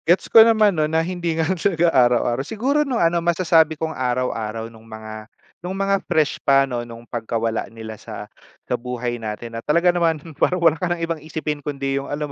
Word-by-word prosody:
Gets 175 +3 +2
ko 225 - +10
naman 220 -2 +5
no'n, 150 - +1
na 165 - +1
hindi 175 -2 -3
nga 160 - +1
nun 180 0 -2
siya 170 -2 +2
araw-araw, 120 -1 +3
siguro 245 - 0
nung 270 -5 -1
ano 170 -1 +2
masasabi 165 -2 +3
kong 160 +1 -3
araw-araw 120 -4 -2
no'ng 115 -1 -13
mga, 110 0 -9 0.3
nung 180 +2 -5
mga 195 0 +1
fresh 155 -2 +1
pa 135 0 +4
'no, 125 -3 -3
no'ng 115 0 -10
pagkawala 115 -1 -3
nila 110 -1 -9
sa - - -8 0.4
sa - - -3
buhay 120 -1 -4
natin 110 +2 -6
na 115 - -5
talaga 170 +6 +2
naman 165 -2 +1 0.2
parang 180 - +3
wala 170 -3 +4
ka 180 - 0
ng 170 -1 -1
ibang 165 -2 -4
isipin 150 -1 -4
kundi 140 -1 -2
yung 140 - -9
alam 150 +1 -2
150 Hz, 205 wpm, -21 LUFS, 120-170 Hz, 0.4 s, ko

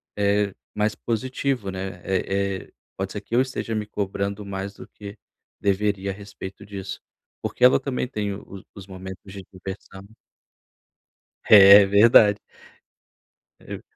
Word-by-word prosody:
eh, 100 -1 +1 0.2
mais 105 0 0
positivo, 125 -1 -2
né? 95 -1 -6
Eh 95 0 -1
eh, - - -26 0.3
pode 95 0 -3
ser 105 - -6
que 115 - -5
eu 125 - +5
esteja 130 -3 -3
me 105 -1 -2
cobrando 100 0 -4
mais 100 0 -5
do - - -12
que 100 0 -11 0.4
deveria 100 0 0
a - - -5
respeito 100 -1 -10
disso. 95 -1 -7 0.4
Porque - - -4
ela 125 - +6
também 130 -2 -3
tem 105 -5 -3
o 100 -1 -10
os 100 -1 -12
momentos 95 0 -10
de 100 -1 -8
diversão. 95 +1 -9 1.4
É 100 -1 +9
verdade. 105 +1 +6 1.2
E - - -8
100 Hz, 140 wpm, -23 LUFS, 95-105 Hz, 1.4 s, É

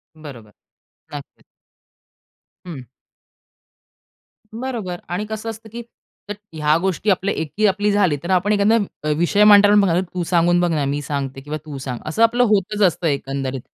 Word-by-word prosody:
बरोबर, 130 -9 -12 0.6
नक्कीच. 145 -1 -10 1.2
हं. 150 -7 -8 1.7
बरोबर. 225 -7 -5
आणि 180 +4 -3
कसं 220 +1 -5
असतं, 225 0 -9
की 235 +3 -7 0.5
त्यात 205 - -5 0.2
ह्या 150 0 +2
गोष्टी 190 +2 -1
जर 195 - +5
आपल्या 195 +2 -3
एकी 160 +7 -2
आपली 205 +1 +1
झाली 185 -7 +2
तर 170 - -6
आपण 185 +3 +2
एखादा 205 +2 +3 0.3
अ, - - -3
विषय 185 +5 +2
मांडताना 205 0 +7
बघ 175 -1 +1
"तू 180 -1 -2
सांगून 175 0 +2
बघ 175 0 +1
ना 150 -3 0
मी 145 +1 -2
सांगते 135 -2 -5
किंवा 145 +2 -5
तू 150 -3 -7
सांग." 130 -3 -6
असं 185 +9 0
आपलं 240 +2 +3
होतंच 210 0 0
असतं 170 0 -2
एकंदरीत. 135 -2 -3
175 Hz, 160 wpm, -20 LUFS, 145-205 Hz, 1.7 s, मांडताना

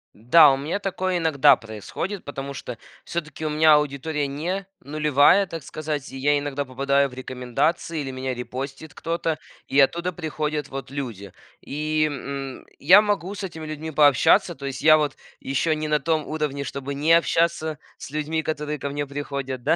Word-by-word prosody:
Да, 140 +7 +7
у 135 - +1
меня 150 +8 -2
такое 185 -2 -1
иногда 160 -5 +5
происходит, 115 - -6
потому 140 -1 -6
что 125 -3 -7 0.3
всё-таки 160 -2 -5
у - - -1
меня 155 +1 +5
аудитория 150 0 0
не 175 +8 -3
нулевая, 150 +6 +4
так 165 -4 -7
сказать, 150 -1 -5
и 135 - -7
я 145 +2 +2
иногда 145 0 -3
попадаю 140 +2 +1
в - - -15
рекомендации, 130 +6 -2
или 135 -2 -4
меня 130 0 -3
репостит 135 +5 -6
кто-то. 165 -1 -2 0.3
И 140 - +2
оттуда 170 +6 +2
приходят 155 -3 -3
вот 135 -1 -7
люди. 115 -9 -6 0.3
И, 155 +2 -1
м, 135 -1 -6
я 185 +8 +8
могу 205 -3 -1
с 200 - -7
этими 165 -4 -6
людьми 155 +1 -5
пообщаться. 145 -4 +4
То 140 +1 -6
есть 135 -1 -5
я 155 0 +8
вот 150 -1 -1 0.2
еще 140 +4 0
не 155 0 -3
на 150 0 +2
том 155 +1 0
уровне, 150 -3 -2
чтобы 140 +1 -5
не 150 +4 +3
общаться 165 -2 +2 0.2
с - - -9
людьми, 155 +1 -2
которые 150 -1 -3
ко 140 - -4
мне 145 +1 -3
приходят, 140 -3 -5
да. - - +3
150 Hz, 175 wpm, -24 LUFS, 135-160 Hz, 0.3 s, я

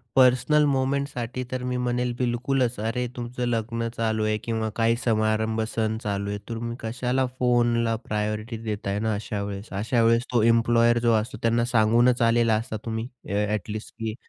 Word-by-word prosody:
Personal 130 +4 +5
मोमेंटसाठी 130 -3 -1
तर 130 - -3
मी 125 - -1
म्हणेल 125 0 -1
बिलकुलच. 125 -1 0
अरे, 115 +3 -1
तुमचं 125 0 -4
लग्न 115 0 -1
चालू 110 -1 0
आहे 110 0 +1
किंवा 110 -1 -1
काही 115 0 +2
समारंभ 110 0 +1
सण 110 -1 0
चालू 100 -1 -2
आहे. 105 - -2
तुम्ही 115 +1 -4
कशाला 125 +3 -1
फोनला 120 -2 +2
प्रायोरिटी 105 +2 -2
देताय 105 -2 -2
ना 110 0 0
अशावेळेस? 100 0 -4
अशावेळेस 115 +3 +2
तो 120 - +4
एम्प्लॉयर 115 0 +4
जो 115 - +5
असतो, 130 +4 -7
त्यांना 115 +1 +2
सांगूनच 120 +3 +4
आलेला 115 -1 +3
असता 110 0 -3
तुम्ही 110 +1 -3 0.2
ॲ 105 +1 +1
ॲटलीस्ट 105 +1 -4
की 110 -1 -3
115 Hz, 155 wpm, -25 LUFS, 110-120 Hz, 0.2 s, Personal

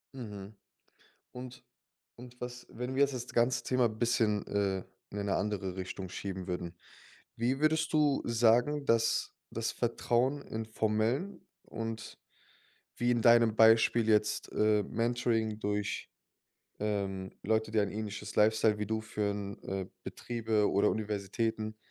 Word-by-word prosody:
Mhm, 105 -5 -8 0.8
und 125 0 -9 0.5
und 125 0 -13
was 125 0 -7
wenn 125 +2 -5
wir 135 - +3
jetzt 140 -1 +2
das 125 -1 -5
ganze 120 +2 +2
Thema 125 -2 +2
bisschen, 110 -2 +1
äh, 100 -2 0 0.3
in 105 - -5
eine 100 -1 0
andere 95 -3 -2
Richtung 95 0 -5
schieben 95 0 -5
würden, 90 -1 -4 0.6
wie 125 +4 0
würdest 160 +1 +2
du 150 -3 +3
sagen, 120 +5 +3
dass 115 0 +2 0.2
das - - -2
Vertrauen 130 +4 0
in 110 -3 -5
formellen 110 - -1 0.2
und 115 -1 -6 0.8
wie 120 0 +2
in 120 - +2
deinem 115 -1 +6
Beispiel 110 0 +5
jetzt, 105 0 +2
äh, 105 -1 +3
Mentoring 115 -2 0
durch 105 -1 -2 0.7
ähm, 95 -3 -2
Leute, 110 +1 +1
die 110 - +1
ein 100 - 0
ähnliches 105 0 -5
Lifestyle 110 0 +4
wie 105 - -2
du 110 +1 -1
führen 100 -2 -3
äh, 95 -1 -3 0.2
Betriebe 110 -2 -1
oder 100 +1 +3
Universitäten 110 +1 -2
110 Hz, 135 wpm, -31 LUFS, 105-120 Hz, 0.8 s, deinem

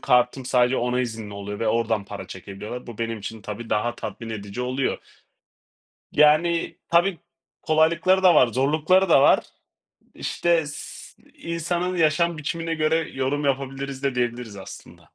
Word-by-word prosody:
kartım 125 +1 +2
sadece 125 0 +2
ona 125 +1 0
izinli 110 -4 -5
oluyor 100 +1 -6
ve 115 - +1
oradan 110 -2 0
para 100 0 -8
çekebiliyorlar. 100 +6 -8
Bu 120 -3 -9
benim 115 -1 -2
için 105 +1 -7
tabii 110 +3 -7
daha 120 +3 0
tatmin 115 0 -7
edici 105 +1 -6
oluyor. 130 +2 -1 1.1
Yani 155 +3 +3
tabii 175 +1 +3 0.4
kolaylıkları 165 +4 +3
da 180 -3 +7
var, 130 - +6
zorlukları 155 - +2
da 140 - +6
var. - - +6 0.8
İşte, 170 -1 +1
s 145 - -8 0.3
iii, 170 - -6
insanın 175 +2 -1
yaşam 165 +1 +2
biçimine 165 +2 -3
göre 155 0 +2 0.2
yorum 135 +2 -1
yapabiliriz 135 0 -3
de 135 -2 0
diyebiliriz 120 -3 -2
aslında. 95 - -11
130 Hz, 145 wpm, -24 LUFS, 115-160 Hz, 1.1 s, da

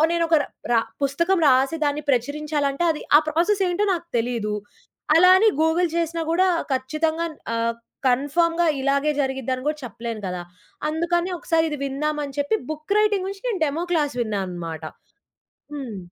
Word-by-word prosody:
నేనొకరా 330 -3 +2 0.3
రా 230 - +5 0.2
పుస్తకం 335 +7 +1
రాసి 265 +5 +3
దాన్ని 290 +1 0
ప్రచురించాలంటే, 285 +3 0
అది 300 - -7 0.2
ఆ - - +3
ప్రాసెస్ 355 +6 +1
ఏంటో 390 +4 0
నాకు 340 -1 -6
తెలీదు. 225 -3 -1 0.6
అలా 365 +3 +7
అని 435 +3 +5
గూగుల్ 335 +2 +2
చేసినా 335 0 -1
గూడా, 370 +2 +3 0.2
ఖచ్చితంగా 315 +5 -1 0.3
ఆహ్, 230 0 0 0.3
కన్ఫర్మ్‌గా 330 +7 +2
ఇలాగే 280 +2 +1
జరిగిద్దని 265 -1 -2
గూడా 300 0 0
చెప్పలేను 230 -2 -6
కదా! 180 -1 -4 0.5
అందుకని 345 +3 0
ఒకసారి 325 -1 +1
ఇది 295 - -4
విందామని 290 +1 -2
చెప్పి, 285 -6 +1
బుక్ 310 +5 -3
రైటింగ్ 415 -3 +2
నుంచి 390 0 -7
నేను 400 -7 -2
డెమో 305 +4 -2
క్లాస్ 295 -5 +1
విన్నా 215 -4 -1
అనమాట. 165 -3 -6 0.9
హ్మ్. 245 -8 -6
300 Hz, 145 wpm, -23 LUFS, 260-335 Hz, 0.9 s, అలా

